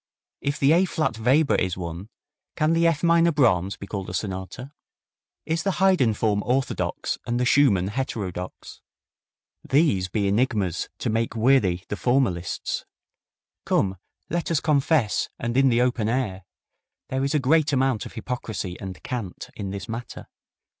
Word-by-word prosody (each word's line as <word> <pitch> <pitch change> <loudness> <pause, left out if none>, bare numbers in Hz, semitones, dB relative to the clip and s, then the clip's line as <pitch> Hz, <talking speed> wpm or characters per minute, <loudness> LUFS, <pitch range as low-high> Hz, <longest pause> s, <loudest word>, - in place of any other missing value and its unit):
If 140 +1 -1
the 140 +1 +4
A 175 +4 +5
flat 155 -10 -1
Weber 135 +6 +3
is 90 -1 0
one, 85 +3 -6 0.5
can 155 0 +2
the 165 0 +3
F 165 -2 0
minor 170 0 +4
Brahms 100 - +2
be - - -8
called 100 -1 -5
a 90 - -4
sonata? 95 +7 -5 0.7
Is 160 +1 0
the 195 - 0
Haydn 180 - +3
form 105 -1 +1
orthodox 130 +2 -1
and 120 +1 0
the 125 - +1
Schumann 105 -10 +4
heterodox? 100 -7 -5 0.8
These 135 - +2
be 100 +2 -1
enigmas 105 -4 0
to - - -2
make 115 +2 -1
weary 110 -7 +3
the - - -3
formalists. 120 -10 0 0.8
Come, 95 -1 +1 0.3
let 170 +1 -2
us 165 -3 +2
confess, 145 -5 +1
and 120 0 -3
in 135 0 +5
the 120 0 +3
open 120 -4 0
air: 105 -7 -2 0.6
there 130 +1 -1
is 140 +2 0
a - - +4
great 150 +3 +3
amount 130 -5 +1
of - - -13
hypocrisy 110 -6 -5
and 95 -5 -8
cant 115 -8 -5
in 100 -2 -5
this 95 -1 -6
matter. 115 +1 -7
120 Hz, 155 wpm, -24 LUFS, 100-140 Hz, 0.8 s, A